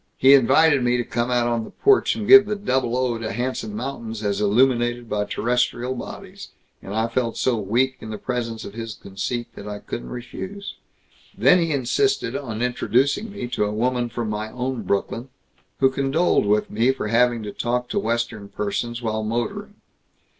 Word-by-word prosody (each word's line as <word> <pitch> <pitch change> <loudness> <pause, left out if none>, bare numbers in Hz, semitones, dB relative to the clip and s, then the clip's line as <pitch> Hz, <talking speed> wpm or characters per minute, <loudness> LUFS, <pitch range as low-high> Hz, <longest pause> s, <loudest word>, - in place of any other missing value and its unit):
"He 135 +1 +7
invited 140 +2 +5
me 125 0 +2
to 120 - 0
come 120 +1 -2
out 120 -1 +2
on 120 -1 0
the - - -9
porch 410 - +3
and 215 -2 -4
give 200 +1 +9
the 210 - -1
double 130 - 0
O. 125 -3 0
to 110 -1 -4
handsome 120 -4 -3
mountains 115 -3 -5
as 100 0 -1
illuminated 120 +2 +2
by 105 -1 -1
terrestrial 125 +2 0
bodies, 195 +9 -8 0.3
and 100 - -7
I 110 +1 +1
felt 115 -1 -1
so 120 -4 +1
weak 125 +6 +1
in 110 - -9
the 110 - -4
presence 115 -2 -4
of 100 - -8
his 115 -1 -6
conceit 110 +5 -5
that 100 - -9
I 105 0 -5
couldn't - - -7
refuse. 190 +11 -7 0.6
Then 180 - +5
he 165 -1 0
insisted 155 - 0
on 115 -4 -3
introducing 130 - +1
me 125 -11 -5
to 120 -4 0
a 105 - -2
woman 120 +2 0
from 115 -1 -4
my 105 +1 -3
own 125 0 -3
Brooklyn, 105 +6 -2 0.5
who 135 0 +4
condoled 135 -1 +1
with 105 +1 +1
me 115 +5 +3
for 130 -5 -4
having 120 0 +3
to 105 - -5
talk 125 +1 -1
to - - 0
Western 115 - -2
persons 120 +4 -3
while 110 -1 -1
motoring. 200 - -3
120 Hz, 185 wpm, -23 LUFS, 110-130 Hz, 0.6 s, give